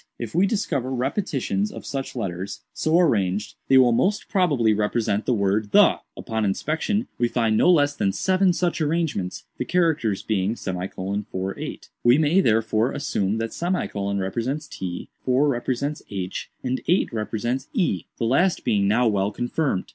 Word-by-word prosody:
If 115 -3 -6
we 185 +4 +3
discover 185 - -1
repetitions 130 - -1
of - - -9
such 135 -1 -4
letters, 95 -4 -4
so 160 +2 +2
arranged, 105 - +1
they 135 - +6
will 125 -2 +6
most 185 - +1
probably 145 - +3
represent 105 0 0
the 125 - +3
word 100 +1 0
'the.' - - +6 0.2
Upon 110 -1 -2
inspection, 155 - -1
we 120 - +3
find 115 -2 +1
no 145 - +4
less 145 -5 +4
than 95 - +1
seven 185 - +2
such 175 -1 -1
arrangements, 155 - -1 0.2
the - - +1
characters 155 - +1
being 105 0 0
;48. 95 0 -4
We 120 +2 +6
may, 160 +5 +4
therefore, 110 - +2
assume 105 -7 -1
that; 115 0 -3 0.6
represents 120 +10 -2
t, 90 -9 -6
4 130 +3 +3
represents 140 +3 -1
h, 95 -2 -4
and 130 0 -1
8 175 -7 +2
represents 120 +4 -2
e—the 120 - -1
last 165 +9 +2
being 100 -2 +2
now 120 +4 +3
well 100 -2 +1
confirmed. 120 0 -1
120 Hz, 150 wpm, -24 LUFS, 105-150 Hz, 0.6 s, they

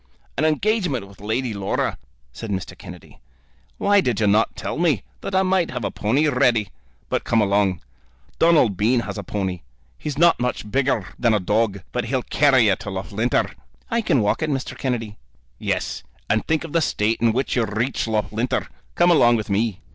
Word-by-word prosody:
"An 155 - +1
engagement 155 - 0
with 100 0 -17
Lady 110 +3 -1
Laura," 100 -1 -1 0.4
said 110 - -7
Mr. 95 -2 -4
Kennedy. 90 -1 -12 0.6
"Why 200 0 +4
did 125 - -1
you 110 - +2
not 105 +2 +2
tell - - -4
me, 170 -4 +2 0.2
that 195 - -4
I 190 - +4
might 185 -2 +1
have 125 -4 -4
a 100 - -2
pony 135 +9 +1
ready? 120 -7 +2 0.4
But - - -1
come 115 - +2
along. 100 -4 +2 0.6
Donald 155 - +4
Bean 115 +6 +2
has 110 - -5
a - - -5
pony. 95 -4 -3 0.4
He's 145 - -4
not 170 +1 +5
much 125 -4 -3
bigger 130 -6 0
than 115 -3 +3
a - - +2
dog, 100 0 0
but 125 -1 -2
he'll 125 +1 -1
carry 135 -5 +4
you 100 -3 +4
to - - -7
Loughlinter." 100 +5 -1 0.4
"I 230 0 +2
can 135 - +2
walk 105 - 0
it, 160 - 0
Mr. 135 -3 -3
Kennedy." 115 -5 -3 0.4
"Yes; - - -2 0.3
and 110 +1 0
think 160 0 +1
of 165 - -8
the 165 - +3
state 110 -6 0
in 115 -1 +4
which 130 +4 -1
you'd 110 -4 -1
reach 120 +1 -1
Loughlinter! 110 +2 -1 0.3
Come 175 0 +4
along 120 -8 +5
with 110 -2 -3
me." 105 -1 0
115 Hz, 190 wpm, -22 LUFS, 105-140 Hz, 0.6 s, not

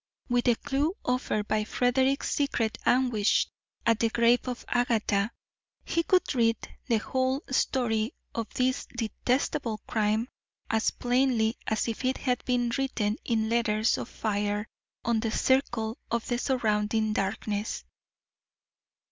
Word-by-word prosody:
With 245 0 +2
the 240 -2 +5
clew 290 +9 -1
offered 250 -4 0
by 215 0 +1
Frederick's 260 +4 +1
secret 245 -6 0
anguish 245 -5 +3 0.4
at 230 -1 +3
the 230 - +2
grave 235 +2 +3
of 250 -1 -4
Agatha, 225 -4 +1 0.6
he 335 - +1
could 365 0 +2
read 230 -3 +3 0.3
the 235 -4 +3
whole 260 +5 0
story 235 -3 +1 0.2
of 230 -1 -4
this 255 0 0
detestable 245 +1 -1
crime 215 +1 +1 0.4
as 220 0 +2
plainly 245 -2 +1
as 220 +1 0
if 230 +2 -3
it 260 +1 +1
had 250 -3 -1
been 245 -1 +1
written 225 -5 0
in 220 -2 +1
letters 225 -1 +2
of - - -5
fire 210 0 -1 0.4
on 235 -2 +2
the 225 0 -1
circle 235 -2 +1
of 235 -1 -1
the 240 -1 0
surrounding 220 -4 +1
darkness. 205 +1 -2
235 Hz, 130 wpm, -28 LUFS, 220-255 Hz, 0.6 s, the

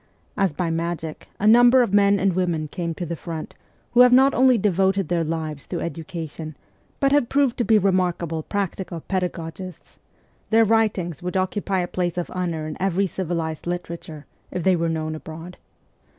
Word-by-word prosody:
As 195 -3 +1
by 165 +3 -2
magic 165 -1 -4
a 205 - -1
number 245 +3 +7
of 200 - -3
men 200 0 +5
and 195 -1 +1
women 170 -4 -1
came 170 0 -4
to 175 - -4
the 170 +1 -4
front 165 -1 -7 0.4
who 245 - +2
have 250 0 +8
not 265 +2 +6
only 255 -1 +5
devoted 195 -2 +1
their 170 -1 +1
lives 155 -2 -4
to 175 - -3
education, 160 -2 -6 0.4
but 275 -1 +2
have 285 -4 +3
proved 275 -3 +2
to - - +3
be 225 -1 +4
remarkable 180 -4 0
practical 190 -2 -4
pedagogists: 180 -1 -5 0.5
their 225 0 +5
writings 205 -7 +1
would 180 +2 -2
occupy 190 0 -1
a 175 - -2
place 175 -1 -2
of 175 - -3
honour 170 -4 -3
in 155 -1 -6
every 195 +1 +1
civilized 170 -4 -3
literature, 170 -3 -5 0.2
if 180 - -4
they 190 -1 +4
were 165 -1 0
known 155 -1 -2
abroad. 160 +3 -9
180 Hz, 175 wpm, -23 LUFS, 165-200 Hz, 0.5 s, have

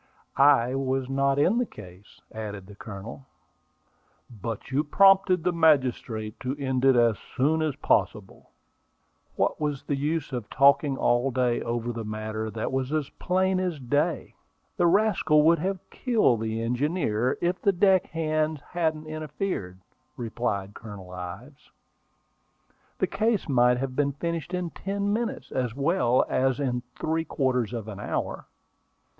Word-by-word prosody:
"I 135 -3 +5
was 135 -1 -1
not 135 0 +2
in 185 +11 +3
the 245 - +1
case," 95 -1 -14
added 105 -3 -6
the 105 - -13
Colonel. 105 +5 -9 1.1
"But 115 +3 -5
you 140 +3 +2
prompted 195 +1 +4
the 180 0 +1
magistrate 130 -9 +1
to 130 +1 -3
end 130 -2 -1
it 135 -1 +6
as 115 -3 +3 0.2
soon 155 +5 +2
as 155 -4 -1
possible." 100 -7 -1 0.9
"What - - 0
was 145 -3 -2
the 145 - -1
use 150 +1 -2
of 120 -4 -4
talking 140 0 +4
all 120 +2 +2
day 125 -2 0
over 120 0 -2
a 115 -1 -5
matter 110 0 -4
that 110 +2 -4
was 130 0 -2
as 155 -3 -1
plain 185 +1 0
as 180 -5 -2
day? 145 +6 -1 0.4
The 175 - +3
rascal 180 -5 +3
would 165 +2 +5
have 190 +2 -3
killed 215 - +2
the 110 0 -2
engineer, 125 -1 0
if 175 +1 -1
the 200 - +4
deck 190 0 +3
hands 155 -1 -1
hadn't 160 -3 -1
interfered," 155 - -4 0.4
replied 110 -4 -3
Colonel 100 -5 -10
Ives. 95 +11 -9 1.3
"The - - +2
case 220 -2 0
might 125 -3 +4
have 130 0 -3
been 140 0 +1
finished 170 +3 -3
in 180 -2 -3
ten 200 +1 -2
minutes, 230 +1 -3
as 125 -3 -2
well 140 -4 +2
as 130 0 +1
in 125 -3 -1 0.2
three 160 +1 0
quarters 130 -7 0
of 115 -3 -5
an 100 -2 -7
hour." - - -4
135 Hz, 150 wpm, -26 LUFS, 115-160 Hz, 1.3 s, it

